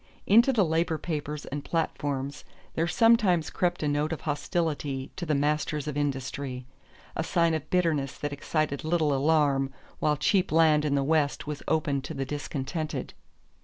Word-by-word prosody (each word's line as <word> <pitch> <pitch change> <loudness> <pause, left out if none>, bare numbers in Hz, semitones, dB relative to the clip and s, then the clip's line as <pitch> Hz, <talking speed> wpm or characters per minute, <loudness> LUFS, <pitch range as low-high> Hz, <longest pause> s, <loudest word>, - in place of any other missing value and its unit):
Into 235 +6 +6
the 215 -7 +3
labor 160 0 +1
papers 150 -2 -4
and 145 +1 -5
platforms 145 -4 -2 0.3
there 165 +1 0
sometimes 200 -5 +3
crept 175 -2 0
a - - +1
note 145 +2 0
of 160 - -4
hostility 145 -3 -2
to 175 -3 -5
the 150 - +2
masters 150 +1 0
of 150 - -3
industry, 135 -2 -3 0.5
a 160 - -1
sign 170 -1 +2
of 155 -1 -3
bitterness 160 -7 +1
that 145 -1 -3
excited 145 0 -1
little 155 -2 +1
alarm 140 -1 +2 0.3
while 150 -1 +2
cheap 190 +5 +2
land 155 -2 +4
in 140 -1 +1
the 140 - +2
West 150 -1 +1
was 150 -1 -5
open 150 -3 +1
to 150 +4 -7
the 135 0 -2
discontented. 145 +2 -4
150 Hz, 165 wpm, -28 LUFS, 140-165 Hz, 0.5 s, Into